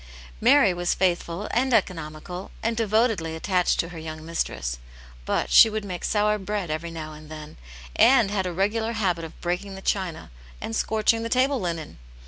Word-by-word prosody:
Mary 250 -4 +5
was 175 0 0
faithful 175 +1 -1
and 250 +1 +2
economical, 175 -2 -3
and 230 +1 0
devotedly 215 -7 +1
attached 180 +2 +1
to 170 - 0
her 170 -2 -8
young 155 0 -7
mistress, - - -3 0.5
but - - -1
she 225 - +9
would 215 -1 -4
make 180 -3 -6
sour 210 0 +1
bread 195 -3 -3
every 160 +2 -3
now 155 -2 -7
and 155 0 -13
then, 155 -1 -9 0.4
and 235 -6 +5
had 190 -3 -1
a - - -3
regular 215 +5 0
habit 185 -6 0
of 160 - -9
breaking 180 +3 -3
the - - -8
china 185 - -2 0.3
and 225 - -4
scorching 220 +1 +1
the 230 - -3
table 260 +2 +2
linen. 165 - -4
185 Hz, 175 wpm, -25 LUFS, 165-220 Hz, 0.5 s, she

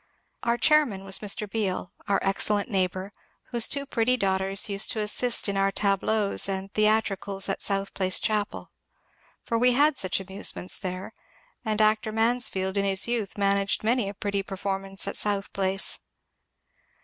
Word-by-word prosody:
Our 235 0 +1
chairman 280 -11 +3
was 195 -1 0
Mr. 210 0 0
Beal, 195 -4 -2 0.2
our 200 - +3
excellent 205 +2 +1
neighbour, 190 +1 -1 0.4
whose 235 -2 +3
two 280 0 -2
pretty 250 -1 +1
daughters 195 -1 +1
used 200 -1 +2
to 220 - -3
assist 225 +3 0
in 200 - -1
our 195 0 +2
tableaux 200 +1 0
and 195 0 -4
theat 215 +1 +3
ricals 195 0 -2
at 195 - -2
South 195 -1 -1
Place 185 -1 +1
chapel. 210 -1 -2 0.7
For 230 - -1
we 250 +1 +4
had 290 +2 +3
such 185 0 +1
amusements 190 -1 -3
there, 185 -1 -5 0.5
and 215 -2 -1
actor 215 0 +2
Mansfield 220 -4 +1
in 200 - +2
his 195 +1 +1
youth 230 -5 -2
managed 200 0 +1
many 225 -2 +1
a 200 - -8
pretty 200 0 -2
performance 195 0 -3
at 200 - -3
South 205 -1 0
Place. 195 0 +1
200 Hz, 160 wpm, -26 LUFS, 195-220 Hz, 0.7 s, we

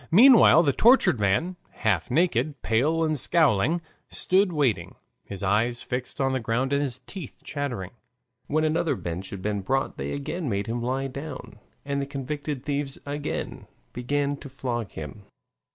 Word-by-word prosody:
Meanwhile 225 - +8
the 140 -4 +2
tortured 205 - +5
man, 130 - +1 0.3
half 100 -7 +2
naked, 155 -1 +1
pale 150 +9 +2
and 155 -2 0
scowling, 155 - +2 0.3
stood 190 +1 +2
waiting, 125 - 0 0.3
his 100 -1 -7
eyes 115 +5 +1
fixed 125 +1 -4
on 135 -1 +1
the 130 - 0
ground 125 +4 -1
and 140 - +2
his 130 -4 -2
teeth 185 -9 -9
chattering. 125 -11 -4 0.6
When 155 +2 +1
another 155 +1 +1
bench 90 +1 -5
had 95 -2 -7
been 105 -1 -1
brought 135 +7 -1
they - - -4
again 145 +2 -3
made 100 -1 -1
him 120 +1 -3
lie 130 +3 -1
down, 140 -4 -7 0.3
and 140 0 -1
the 140 - -3
convicted 145 0 -4
thieves 140 -1 -2
again 145 +1 -4 0.3
began 140 +3 -1
to 140 - -10
flog 120 -5 -3
him. 80 +7 -8
135 Hz, 160 wpm, -26 LUFS, 115-155 Hz, 0.6 s, Meanwhile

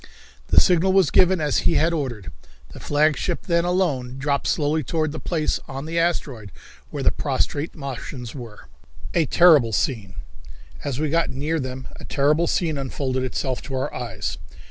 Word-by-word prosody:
The - - +6
signal 180 +2 +3
was 190 -1 +4
given 185 0 +4
as 150 -3 +1
he - - +2
had 165 +3 +3
ordered. 125 - -4 0.4
The - - -11
flagship 155 +4 +1
then 170 -2 +2
alone 145 -9 0
dropped 140 +1 -1
slowly 155 0 +1
toward 155 +3 -1
the 155 - -6
place 160 -3 -1
on 135 +2 -6
the 165 +1 -1
asteroid 135 - -1 0.4
where - - -4
the - - +4
prostrate 145 +4 -2
Martians 130 -4 -6
were. 115 -6 -10 0.5
A 165 -4 +2
Terrible 150 -10 +6
Scene. 105 -9 -1 0.7
As 140 -2 -3
we 155 -1 0
got 165 +1 +2
near 150 +5 -2
them 130 -1 -5
a - - -12
terrible 150 +4 +2
scene 160 -5 0
unfolded 130 -1 -2
itself 130 0 -2
to 135 - -6
our 130 - -2
eyes. 100 -5 -4
145 Hz, 165 wpm, -23 LUFS, 130-165 Hz, 0.7 s, The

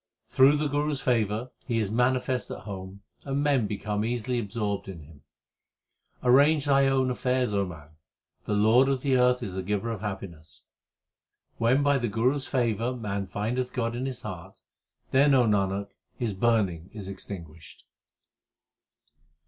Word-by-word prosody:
Through 135 +3 +5
the 150 0 0
Guru 145 +1 0
s 140 - -3
favour 115 -1 0 0.2
He 120 -3 0
is 105 -3 -1
manifest 125 0 0
at - - -6
home, 95 -1 -8 0.2
and 140 +1 -1
men 135 -7 +2
become 105 +1 -2
easily 120 +1 -1
absorbed 105 -2 -3
in 85 -5 -9
Him. 75 -1 -16 1.0
Arrange 140 +4 +5
thine 140 -1 +4
own 130 -1 +2
affairs, 125 -2 0
O 100 -1 +1
man; 75 -4 -11 0.6
the 105 - -1
Lord 115 +6 +5
of 135 -2 -1
the 135 -2 +2
earth 125 0 +3
is 100 -5 -5
the 95 - -3
Giver 105 +4 -2
of 110 -4 -5
happiness. 85 -7 -7 1.0
When 125 +5 +3
by 145 -1 +3
the 120 - -1
Guru 115 +6 +1
s 140 - -5
favour 120 -1 0
man 100 -4 -3
findeth 120 +6 -2
God 115 -2 -1
in 130 +2 -3
his 130 -2 -6
heart, 90 -6 -9 0.5
then, 140 +2 +5
Nanak, 100 -5 +2 0.3
his 115 -5 -2
burning 95 -5 0
is 105 -4 -8
extinguished. 85 -5 -9
115 Hz, 155 wpm, -27 LUFS, 100-130 Hz, 1.0 s, Through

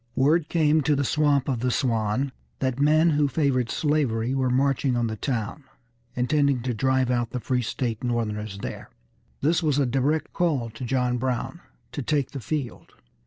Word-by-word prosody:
Word 150 +4 +2
come 155 -2 +3
to 150 0 +2
the 140 - 0
Swamp 145 -1 +2
of 130 -4 -1
the 125 +2 0
Swan 120 +1 0 0.3
that 130 -1 -1
men 155 +3 +4
who 145 -1 +2
favored 135 -4 +1
slavery 130 -6 0
were 130 -1 +1
marching 135 0 +1
on 120 - +1
the 110 -1 -2
town, 115 +3 -3 0.5
intending 140 0 +1
to 125 -1 -1
drive 130 +2 +1
out 120 -2 0
the 125 - -4
free 125 +1 0
state 120 0 -3
Northerners 110 -4 -2
there. - - -6 0.5
This 160 +4 +2
was 150 -4 +1
a 140 - +3
direct 135 +5 0
call 140 -10 0
to 115 +3 -7
John 125 0 0
Brown 130 +7 -2 0.3
to 145 - -4
take 145 0 0
the 140 - -5
field. 130 +1 -5
130 Hz, 175 wpm, -25 LUFS, 120-145 Hz, 0.5 s, men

